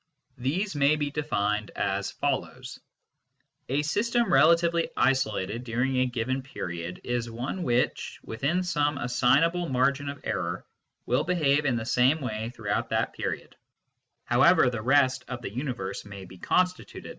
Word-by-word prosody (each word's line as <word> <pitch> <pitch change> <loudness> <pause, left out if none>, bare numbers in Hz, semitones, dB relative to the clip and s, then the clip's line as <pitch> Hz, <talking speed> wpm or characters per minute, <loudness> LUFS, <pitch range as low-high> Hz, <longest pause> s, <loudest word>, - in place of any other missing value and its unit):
These 165 +10 -1
may 145 +1 +4
be 145 -1 -2
defined 105 -9 -1
as 100 0 -1
follows: - - -3 0.9
A 140 +3 +1
system 230 +9 +1
relatively 170 0 +4
isolated 115 -4 +1
during 125 +2 -1
a 130 0 +3
given 125 +2 -2
period 90 -9 -6
is 120 -1 -2
one 125 +11 -4
which, 125 -5 0
within 140 +11 -1
some 150 -4 0
assignable 145 +8 +2
margin 140 +2 +1
of 140 -1 -7
error, - - -2 0.4
will - - +1
behave 150 -5 +2
in 130 -4 +2
the 115 -1 -3
same 125 +6 +3
way 110 -4 -3
throughout 105 -4 -2
that - - 0
period, - - -5 0.7
however 125 - +5
the 115 -3 -4
rest 130 +2 +3
of 125 -2 -6
the 100 - -5
universe 120 -7 -4
may 100 -2 -9
be 95 - -14
constituted. 180 - -1
130 Hz, 145 wpm, -27 LUFS, 115-150 Hz, 0.9 s, however